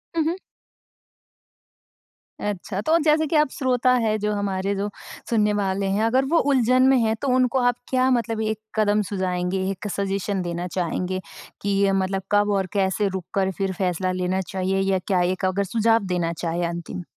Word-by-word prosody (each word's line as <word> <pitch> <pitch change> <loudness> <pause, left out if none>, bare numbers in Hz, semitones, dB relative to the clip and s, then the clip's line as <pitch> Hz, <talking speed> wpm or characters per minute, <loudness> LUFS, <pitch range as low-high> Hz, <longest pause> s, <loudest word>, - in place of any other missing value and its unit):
हुँ, 320 - +2
हुँ। 340 +3 0 2.0
अच्छा। 200 -1 -3
तो 320 +6 +3
जैसे 310 0 +3
कि 315 - -1
आप 300 -2 +4
श्रोता 255 -1 +1
हैं, 215 -1 +1
जो 210 0 -1
हमारे 200 -1 -1
जो 200 +1 -2 0.4
सुनने 210 -3 +2
वाले 195 -1 0
हैं 220 - +1
अगर 255 +4 +2
वो 335 - +5
उलझन 255 0 +4
में 265 - +5
हैं, 225 -2 +2
तो 280 - -2
उनको 255 +1 +2
आप 245 -1 +2
क्या 255 0 +2
मतलब 230 -2 0
एक 220 -1 -1 0.2
कदम 210 -1 +2
सुझाएँगे, 185 -1 -1
एक 195 +2 -6
सजेशन 195 0 -2
देना 175 0 -3
चाहेंगे 185 +1 -2 0.4
कि 200 - -2
ये 195 -1 +3
मतलब 195 0 0
कब 205 0 +3
और 190 -1 -1
कैसे 195 +1 +1
रुक 190 -2 -4
कर 190 -1 +1
फिर 195 -1 -1
फ़ैसला 185 0 -1
लेना 185 +1 -1
चाहिए 190 0 -1
या 195 -1 +1
क्या 185 -3 +2
एक 185 +2 0
अगर 190 +2 +1
सुझाव 225 +2 +2
देना 170 -1 0
चाहे 170 +1 -2
अंतिम? 170 +1 -5
200 Hz, 180 wpm, -23 LUFS, 185-225 Hz, 2.0 s, वो